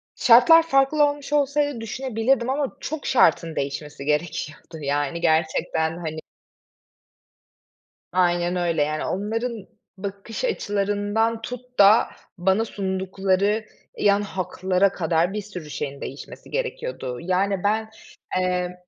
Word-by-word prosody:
Şartlar 255 +8 +7
farklı 275 +1 +3
olmuş 290 0 -6
olsaydı 285 -3 +1
düşünebilirdim 240 +1 0
ama 280 0 -2
çok 310 -2 -5
şartın 170 -10 +3
değişmesi 140 +1 -4
gerekiyordu. 155 +1 -3
Yani, 145 +4 -1
gerçekten, 160 0 +1
hani 160 -2 -5 1.9
Aynen 175 0 +2
öyle. 170 -3 0
Yani, 155 +1 -2
onların 220 +2 -3 0.3
bakış 200 - -5
açılarından 205 - 0
tut 250 +1 -8
da 205 +3 +7 0.3
bana 190 +5 +2
sundukları 195 +1 -1 0.3
yan 200 0 +3
haklara 185 0 0
kadar 170 +1 0
bir 210 - -2
sürü 180 -7 -9
şeyin 140 -1 -5
değişmesi 135 - -9
gerekiyordu. - - -4
Yani, 185 +2 0
ben, 220 +2 +1 0.5
emm 180 -1 -1
195 Hz, 110 wpm, -23 LUFS, 170-230 Hz, 1.9 s, Şartlar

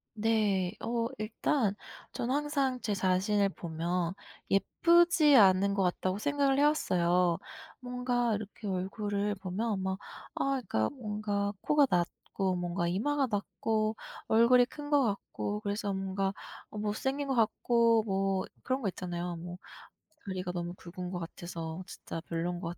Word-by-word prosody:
네. 210 -4 +1
어 230 0 0
일단 215 0 0 0.4
저는 245 +2 -2
항상 280 -3 0
제 210 - -1
자신을 195 +1 +2
보면 170 +1 -2 0.4
'예쁘지 335 - +5
않은 195 -1 +6
것 200 -1 +1
같다.'고 185 +1 0
생각을 280 +3 +1
해왔어요. 180 - +3 0.4
뭔가 245 -2 0
이렇게 210 0 -7
얼굴을 200 +2 -1
보면 195 +2 -2
막 190 0 -1 0.4
아 275 0 +1
그니까 110 - +1
뭔가 210 -5 -2
코가 295 -2 +4
낮고 180 +2 -1
뭔가 175 0 -1
이마가 270 +10 +1
낮고 215 +1 -1 0.3
얼굴이 240 +2 +6
큰 290 +3 -9
것 290 -2 +4
같고 205 -1 -2
그래서 205 0 -2
뭔가 195 0 -1 0.4
어 210 - -9
못생긴 265 +7 -1
거 270 - 0
같고 230 0 +3
뭐 195 -1 0 0.2
그런 260 +1 -1
거 220 - -1
있잖아요. 175 -1 -4
뭐 175 +1 -7 0.7
다리가 185 -2 -3
너무 175 0 -4
굵은 180 0 -7
거 180 - -3
같아서 170 0 -6
진짜 165 - -7
별로인 175 +1 -2
것 175 0 -5
205 Hz, 270 characters per minute, -31 LUFS, 185-235 Hz, 0.7 s, 않은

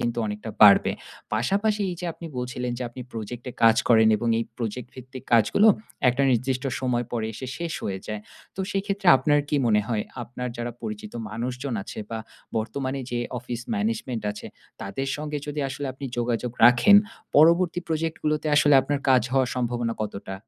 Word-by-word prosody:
কিন্তু 120 0 -1
অনেকটা 105 +1 -5
বাড়বে। 100 -1 +7 0.4
পাশাপাশি 205 - +1
এই 175 - -5
যে - - -5
আপনি 170 - -10
বলছিলেন 125 0 -3
যে - - -4
আপনি 120 +2 -10
Project 115 +2 -6
এ - - -11
কাজ 115 0 +7
করেন 110 -2 +6
এবং 120 +2 -2
এই 115 - -1
Project 120 +1 -4
ভিত্তিক 130 0 -10
কাজগুলো 120 - +5 0.4
একটা 125 +3 +2
নির্দিষ্ট 130 +2 0 0.2
সময় 125 -2 0
পরে 115 -2 -1
এসে 130 +4 -7
শেষ 170 -1 -3
হয়ে 95 -1 -2
যায়। 105 -1 -4 0.4
তো - - -3
সেই 195 -1 -1
ক্ষেত্রে 200 -2 -3
আপনার 145 +2 +2
কী 150 - +1
মনে 105 -2 +4
হয়, 110 -3 0 0.2
আপনার 125 +1 -5
যারা 120 0 -4
পরিচিত 215 0 -6 0.2
মানুষজন 125 +3 -4
আছে - - -9
বা 115 - -3 0.4
বর্তমানে 130 +4 -2
যে 120 - -1 0.2
Office 120 -1 -6
Management 205 - -2
আছে, 105 - -8 0.3
তাদের 115 +8 -4
সঙ্গে 150 0 -4
যদি 150 0 -3
আসলে 140 +1 -5
আপনি 135 +2 -9
যোগাযোগ 120 0 -1
রাখেন, 125 - +7 0.4
পরবর্তী 170 +3 +5
Project 160 0 -1
গুলোতে 150 0 0
আসলে 145 -1 +5
আপনার 145 0 -2
কাজ 130 -1 +5
হওয়ার 130 -2 +2
সম্ভাবনা 120 -1 -1
কতটা? 100 -2 -6
125 Hz, 180 wpm, -25 LUFS, 115-150 Hz, 0.4 s, বাড়বে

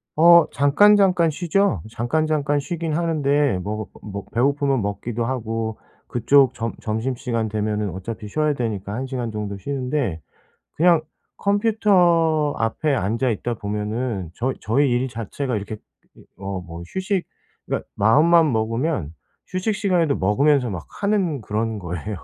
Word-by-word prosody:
어 170 +1 +7
잠깐잠깐 180 +3 +4
쉬죠. 175 - +1
잠깐잠깐 145 +4 0
쉬긴 165 +2 -3
하는데 145 - +1
뭐 105 +1 -4 0.2
뭐 105 - -8
뭐 100 0 -5
배고프면 140 +2 +1
먹기도 110 +4 -3
하고 115 -3 -3 0.3
그쪽 130 +2 +4
점 115 -1 -3
점심시간 115 0 -2
되면은 105 -1 -1
어차피 100 +4 -6
쉬어야 150 +7 0
되니까 105 -6 -3
1 130 +4 -3
시간 125 -3 -3
정도 105 -2 -4
쉬는데 125 - -2 0.5
그냥 170 0 +4 0.4
컴퓨터 180 -8 +3
앞에 135 +6 0
앉아 115 +5 0
있다 120 +2 -2
보면은 105 -2 -3
저 125 +7 -1
저희 135 +6 +2
일 125 +2 +1
자체가 115 +2 -3
이렇게 105 +2 -6 0.6
어 95 -1 -4
뭐 85 -1 -9
휴식 190 -1 -1 0.4
그러니까 - - -3
마음만 155 +8 +5
먹으면 115 - -1 0.3
휴식 185 +4 -2
시간에도 180 -8 +1
먹으면서 125 +5 +2
막 90 -4 -6
하는 200 -8 +1
그런 110 +1 -2
거예요. 90 +2 -5
125 Hz, 295 characters per minute, -22 LUFS, 110-155 Hz, 0.6 s, 어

